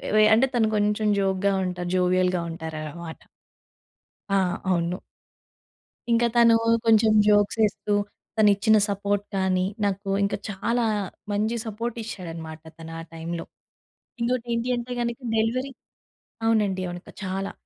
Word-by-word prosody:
వె 215 - +6
అంటే 230 +5 +5
తను 225 -2 +3
కొంచెం 210 +1 +1
జోక్‌గా 195 0 +1
ఉంటారు. 180 -1 -3
జోవియల్‌గా 180 0 +2
ఉంటారనమాట. 160 0 -7 1.1
ఆ! 195 - +2 0.3
అవును. 175 -1 0 1.1
ఇంకా 235 +1 +4
తను 235 -1 +6 0.3
కొంచెం 220 -1 +5 0.2
జోక్స్ 205 +1 +3
ఎస్తూ, 205 +1 -3 0.4
తను 210 -1 +6
ఇచ్చిన 215 +2 +4
సపోర్ట్ 200 0 -1
కానీ, 185 -1 +1 0.2
నాకు 200 0 -2
ఇంకా 200 - 0
చాలా 230 +4 0 0.5
మంచి 215 +3 0
సపోర్ట్ 225 +2 -4
ఇచ్చాడన్నమాట 165 -6 -7 0.2
తను 165 0 -9
ఆ - - -5
టైంలో. 165 +1 -5 0.8
ఇంకొకటి 245 0 0
ఏంటి 235 +2 -1
అంటే, 240 +1 -6
గనక 235 +1 -2 0.2
డెలివరీ 250 +5 0 0.7
అవునండి. 205 -4 +2
అవును. 175 0 -7
క - - -10
చాలా. 190 +1 -3
200 Hz, 125 wpm, -25 LUFS, 180-225 Hz, 1.1 s, వె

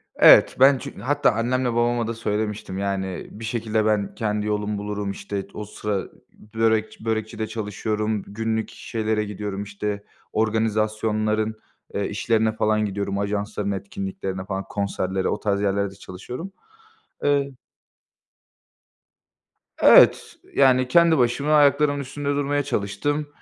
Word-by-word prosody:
Evet, - - +7
ben 135 0 +7
çünkü - - -9
hatta 145 +3 +2
annemle 120 +2 0
babama 120 0 +1
da 115 - -2
söylemiştim 105 -3 -3
yani, 100 -1 -1
e 95 +3 -8
bir 115 - -6
şekilde 110 -2 -1
ben 105 -2 0
kendi 105 -1 -1
yolumu 105 0 -1
bulurum, 105 0 -3
işte 100 0 -5
t - - -15
o 105 - -4
sıra 105 0 -4
ı 95 - -6 0.4
börekçi 110 0 0
börekçide 110 0 -2
çalışıyorum, 105 0 -2
günlük 110 +1 -2
şeylere 110 -1 -2
gidiyorum, 100 -1 -5
işte 105 0 -4 0.3
organizasyonların, 110 0 0 0.4
eee, 100 - -1
işlerine 110 +1 +1
falan 110 0 +1
gidiyorum, 100 0 -2
ajansların 100 0 -2
etkinliklerine 95 -1 -5
falan, 95 0 -3
konserlere, 95 -2 -2
o - - -1
tarz 100 -1 0
yerlerde 100 -1 0
çalışıyorum. 120 - -8 0.7
Eee 140 -1 +2 2.3
Evet, - - +6 0.2
yani 130 -2 +4
kendi 170 +3 +5
başıma 130 +4 +1
ayaklarımın 145 0 +4
üstünde 140 +1 -4
durmaya 145 0 0
çalıştım. 145 +5 -2
110 Hz, 130 wpm, -23 LUFS, 100-120 Hz, 2.3 s, Evet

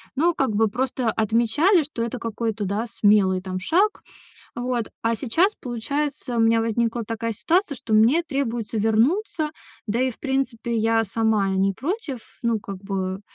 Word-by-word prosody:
но 335 +5 +3
как 265 -4 +1
бы 220 +1 +4
просто 250 +2 -2
отмечали, 235 - +3
что 275 -6 -4
это 235 +1 -4
какой-то, 225 -2 -3
да, 205 +5 -1
смелый 205 -4 +3
там 185 -1 -4
шаг. 375 - +1 0.5
Вот, 240 -2 -2
а 230 0 +2
сейчас, 330 - +1
получается, 255 +2 -3
у - - +2
меня 225 0 +4
возникла 230 +1 0
такая 230 +1 -3
ситуация, 330 - +1
что 225 -2 -4
мне 240 +11 +5
требуется 240 -7 -2
вернуться. 300 - +1 0.4
Да 230 +4 0
и 260 - +2
в - - -18
принципе 260 -4 -1
я 225 0 +2
сама 215 -1 +1
не 190 +1 +2
против. 305 - -3 0.2
Ну, 230 -2 +1
как 195 -1 -7
бы 190 -1 -3
230 Hz, 160 wpm, -23 LUFS, 220-270 Hz, 0.5 s, мне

